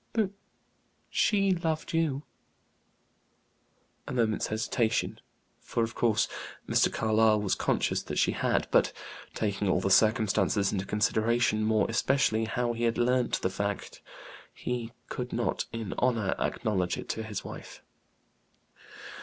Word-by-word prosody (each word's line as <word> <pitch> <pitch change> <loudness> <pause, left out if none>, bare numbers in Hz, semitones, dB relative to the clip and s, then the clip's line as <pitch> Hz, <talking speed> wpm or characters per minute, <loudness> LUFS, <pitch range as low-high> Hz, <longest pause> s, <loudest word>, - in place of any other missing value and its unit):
"But 215 -4 +1 0.8
she 195 -2 +3
loved 165 -4 -1
you." 155 -4 0 1.8
A - - -5
moment's 115 -4 +1
hesitation; 110 +1 0 0.4
for, 115 - -1
of 115 0 -3
course, 115 -3 +2 0.4
Mr. - - +3
Carlyle 110 0 +3
was 100 -2 0
conscious - - 0
that - - -5
she - - +3
had; - - 0
but, - - +3 0.4
taking 100 -2 -1
all 90 - +3
the 95 +1 -1
circumstances 105 -2 +3
into 95 -1 -2
consideration, 110 +1 +1
more 110 -1 +2
especially 115 -2 +2
how 120 +1 -1
he 120 0 +1
learnt 125 +2 +1
the 95 - +1
fact, 100 +1 -4 0.5
he 120 -2 -4 0.2
could 125 0 -5
not, 120 0 -1
in 115 -4 -4
honor, 115 -6 +1
acknowledge 95 -5 -1
it - - -7
to 110 - -2
his 110 -2 -5
wife. - - -9
110 Hz, 130 wpm, -29 LUFS, 105-125 Hz, 1.8 s, she